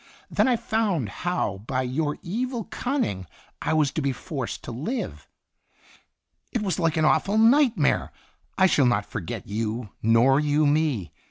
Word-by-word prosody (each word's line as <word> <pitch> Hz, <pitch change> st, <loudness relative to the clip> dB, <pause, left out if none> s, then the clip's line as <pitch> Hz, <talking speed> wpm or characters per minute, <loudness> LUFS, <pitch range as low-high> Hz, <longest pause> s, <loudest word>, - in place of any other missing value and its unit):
Then -, -, +3 dB
I 250 Hz, -, +4 dB
found 215 Hz, -, -1 dB
how 175 Hz, -, -2 dB
by 130 Hz, -1 st, 0 dB
your 145 Hz, +4 st, -1 dB
evil 235 Hz, +5 st, -2 dB
cunning 220 Hz, -, -2 dB, 0.3 s
I -, -, 0 dB
was 150 Hz, -3 st, +2 dB
to 155 Hz, -, -2 dB
be 140 Hz, -1 st, +1 dB
forced 135 Hz, -2 st, -5 dB
to -, -, -6 dB
live. 160 Hz, -, -4 dB, 1.2 s
It 235 Hz, -4 st, -1 dB
was 185 Hz, -4 st, -1 dB
like 165 Hz, -2 st, +1 dB
an 155 Hz, -, +3 dB
awful 200 Hz, +6 st, +2 dB
night 240 Hz, +1 st, +5 dB
mare. 145 Hz, -, +1 dB, 0.5 s
I 190 Hz, -, +5 dB
shall 145 Hz, -7 st, +4 dB
not 105 Hz, -4 st, +1 dB
forget 100 Hz, -8 st, -6 dB
you, 110 Hz, +1 st, -3 dB
nor 115 Hz, +5 st, +4 dB
you 150 Hz, 0 st, +2 dB
me. 145 Hz, -, +1 dB
155 Hz, 160 wpm, -25 LUFS, -, 1.2 s, night